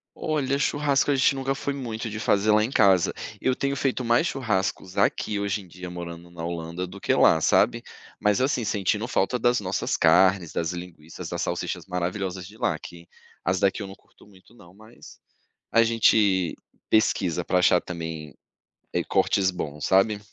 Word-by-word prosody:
Olha, 140 -3 -1
churrasco 145 -1 +1
a - - +2
gente 135 +1 +3
nunca 135 0 -1
foi 140 +1 -3
muito 115 -4 -5
de 110 - -5
fazer 105 0 +2
lá 105 0 +4
em 120 - -2
casa. 95 -7 +4 0.3
Eu 130 - +1
tenho 140 +1 -1
feito 130 -2 -1
mais 120 +7 +2
churrascos 95 -7 -2
aqui, 100 +1 +1
hoje 100 0 -2
em 95 - -15
dia, 90 +1 -9
morando 85 -1 -8
na 85 -1 -8
Holanda, 85 +1 -4
do 100 +2 -11
que - - +1
lá, 80 - +5
sabe? - - +2 0.4
Mas 105 +2 +2
assim, 130 -3 0
sentindo 105 +2 -1
falta 125 +3 0
das 120 +1 +2
nossas 95 0 -1
carnes, 90 +1 +4
das 85 +1 -2
linguiças, 85 -3 -9
das - - -3
salsichas - - -3
maravilhosas 90 +1 -3
de 105 +2 -15
lá, - - 0
que 85 0 -12 0.4
as 95 0 +1
daqui 100 +2 +1
eu 100 - -5
não 95 - -10
curto - - -24
muito 100 +2 -21
não, 90 -6 -17
mas 110 +3 -16 0.5
a 115 0 +5
gente 105 -6 +3 0.3
pesquisa 90 -5 +2
para 90 +1 +1
achar 90 0 +4
também, 80 -4 -6 0.6
eh, - - 0
cortes 95 -1 +1
bons, 75 -4 -5
sabe? 100 +2 +3
100 Hz, 180 wpm, -25 LUFS, 90-115 Hz, 0.6 s, lá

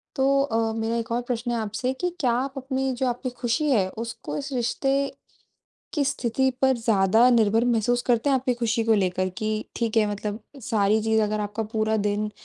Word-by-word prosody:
तो 275 0 +3
अ, 225 -4 0
मेरा 225 +1 -1
एक 230 0 -4
और 235 +1 0
प्रश्न 240 0 -3
है 240 - 0
आपसे 225 +4 -2
कि 360 +7 -2
क्या 250 -6 +2
आप 260 +3 -1
अपनी 265 0 -1
जो 255 +1 0
आपकी 245 +1 -2
खुशी 245 +4 -1
है, 200 -7 +3
उसको 230 +8 -6
इस 280 0 -5
रिश्ते 250 +2 0 1.0
की 295 -4 +1
स्थिति 265 -1 0
पर 265 -1 +4
ज़्यादा 225 0 +4
निर्भर 225 -1 +3
महसूस 240 0 +1
करते 245 +3 +2
हैं - - +4
आपकी 255 -1 +1
खुशी 235 -1 0
को 225 - +3
लेकर 185 -2 +1
कि 215 - -2 0.3
ठीक 230 -2 -1
है 215 -1 +4
मतलब 205 +1 -4 0.2
सारी 210 0 +2
चीज़ 220 0 +2
अगर 210 0 -1
आपका 210 +2 -3
पूरा 220 0 +1
दिन 210 0 -1
230 Hz, 200 wpm, -25 LUFS, 220-255 Hz, 1.0 s, पर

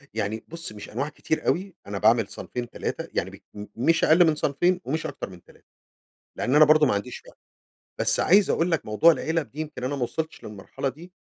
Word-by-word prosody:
يعني 110 0 -2
بُص 165 -3 -8
مش 105 -1 -10
أنواع 135 +7 -3
كتير 160 +1 -3
اوي، 190 +1 0
أنا 100 0 -4
باعمل 110 +1 +3
صنفين، 120 +3 -6
3 - - -4
يعني - - -1
بال 105 0 -12
مش 160 +8 +2
أقل 165 +2 +6
من 155 - +2
صنفين 175 +5 +1
ومش 155 +4 -2
أكتر - - -5
من 90 -2 -14
3، - - -22 0.7
لأن 130 - 0
أنا 155 +1 +8
برضه 155 0 +5
ما 130 - +2
عنديش 105 +5 -4
وقت - - -17 0.6
بس - - +1
عايز 195 +2 +5
أقول 170 +2 +1
لك 165 - 0
موضوع 110 +11 +5
العلب 160 -2 -2
دي 150 - -10
يمكن 150 -5 -7
أنا 130 +3 -1
ما 135 - -2
وصلتش 160 +6 -4
للمرحلة 105 +6 -5
دي، 170 +7 -13
145 Hz, 210 wpm, -25 LUFS, 115-165 Hz, 0.7 s, أنا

